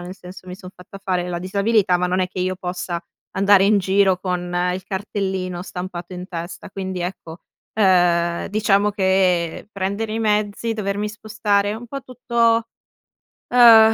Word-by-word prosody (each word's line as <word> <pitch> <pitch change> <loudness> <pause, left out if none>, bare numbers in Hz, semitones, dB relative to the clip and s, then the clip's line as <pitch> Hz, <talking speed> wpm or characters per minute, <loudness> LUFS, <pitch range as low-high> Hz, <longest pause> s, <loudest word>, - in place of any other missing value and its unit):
nel 180 +1 -7
senso, 185 0 -12
mi 180 - -7
son 185 -1 -11
fatta 180 +2 -13
fare 180 -2 -1
la 175 -1 -3
disabilità, 200 0 +2
ma 180 - +1
non 185 +1 0
è 185 - 0
che 185 - -9
io 185 +1 0
possa 180 -1 -4 0.3
andare 195 0 +5
in 205 +1 +4
giro 190 -1 +2
con 180 -1 -3 0.2
il 185 - -6
cartellino 190 -3 -3
stampato 180 -1 -7
in 180 +1 -7
testa. 170 +1 -7
Quindi 190 -2 -5
ecco, 175 -2 -6 0.4
ehm, 175 -4 +3
diciamo 205 -1 +2
che 190 -2 +1
prendere 200 +3 -2
i 225 - -2
mezzi, 210 +1 0
dovermi 205 -1 -2
spostare 210 -1 -1
un 240 +2 -8
po' 275 +4 -5
tutto, 235 -2 +1 0.9
ehm, 225 -2 +8
190 Hz, 160 wpm, -21 LUFS, 180-210 Hz, 0.9 s, ehm